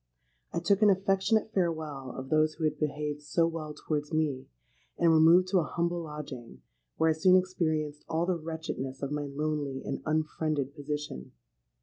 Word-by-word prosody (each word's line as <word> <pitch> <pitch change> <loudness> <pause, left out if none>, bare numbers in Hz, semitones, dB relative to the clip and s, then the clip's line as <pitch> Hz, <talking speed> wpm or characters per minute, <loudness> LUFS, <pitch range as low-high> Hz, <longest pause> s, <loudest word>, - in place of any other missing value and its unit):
I - - -4
took 195 +4 +2
an 210 - +7
affectionate 195 +3 +2
farewell 155 -7 -2
of 130 0 -6
those 155 0 +3
who 160 - -6
had 150 -1 0
behaved 150 0 -2
so 165 +3 +1
well 160 -2 -4
towards 150 -1 -3
me, 150 -4 0 0.5
and 170 -1 +4
removed 165 +3 +6
to 185 -1 +4
a - - +1
humble 170 +2 -1
lodging, 140 - -8 0.3
where 160 0 +4
I - - +3
soon 185 +4 +5
experienced 155 -5 -1
all 165 +1 +1
the 185 - +1
wretchedness 160 -5 -5
of 140 - -2
my 150 0 -2
lonely 145 -1 -2
and 135 - -3
unfriended 155 -2 -1
position. 145 - -5
155 Hz, 165 wpm, -29 LUFS, 145-170 Hz, 0.5 s, an